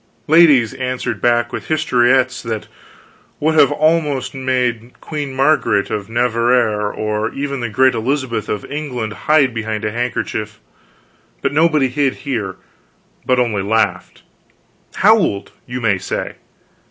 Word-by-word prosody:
Ladies 145 -7 +5
answered 125 -5 -3
back 120 0 +1
with - - -5
historiettes 130 -4 +2
that 110 -2 -5 0.7
would 160 +1 +1 0.2
almost 150 -3 +1
have 135 - -7
made 125 -2 -2
Queen 145 -3 -5
Margaret 130 -7 +1
of 105 0 -4
Navarre 115 -3 +1
or 105 0 -2
even 140 -1 -3
the 120 -2 -3
great 130 +4 +3
Elizabeth 120 -1 -2
of 105 - -3
England 130 -7 -4
hide 145 0 +2
behind 110 -1 -3
a 105 - -1
handkerchief, 110 -2 -3 0.8
but - - 0
nobody 155 -3 +3
hid 135 +1 0
here, 110 -9 -3 0.7
but 130 - +3
only 115 -5 0
laughed 100 -2 -1 0.7
howled, 195 - +2 0.2
you 125 0 -4
may 105 -5 +1
say. 95 - -4
125 Hz, 130 wpm, -18 LUFS, 110-140 Hz, 0.8 s, Ladies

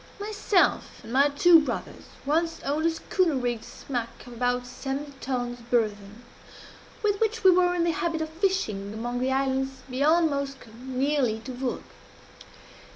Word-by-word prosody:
"Myself 415 -2 +1
and 230 - -8
my 280 +2 +5
two 330 +4 +6
brothers 300 - -4 0.2
once 325 +3 0
owned 305 +4 +1
a - - +4
schooner 330 0 0
rigged 245 -3 -2
smack 240 -4 -6
of 245 - -10
about 245 +1 0
seventy 275 +3 -5
tons 245 -2 -3
burden, 220 -2 -2 0.8
with 410 -1 +1
which 450 0 0
we 380 - +8
were 360 0 +3
in 345 - +1
the 340 - +2
habit 330 0 -1
of 315 - -5
fishing 315 - -1
among 240 +2 -3
the 260 +1 0
islands 265 0 -1
beyond 305 +5 +3
Moskoe, 275 -4 -4
nearly 260 -2 0
to 255 +3 -7
Vurrgh. 250 0 -3
270 Hz, 155 wpm, -26 LUFS, 245-330 Hz, 0.8 s, we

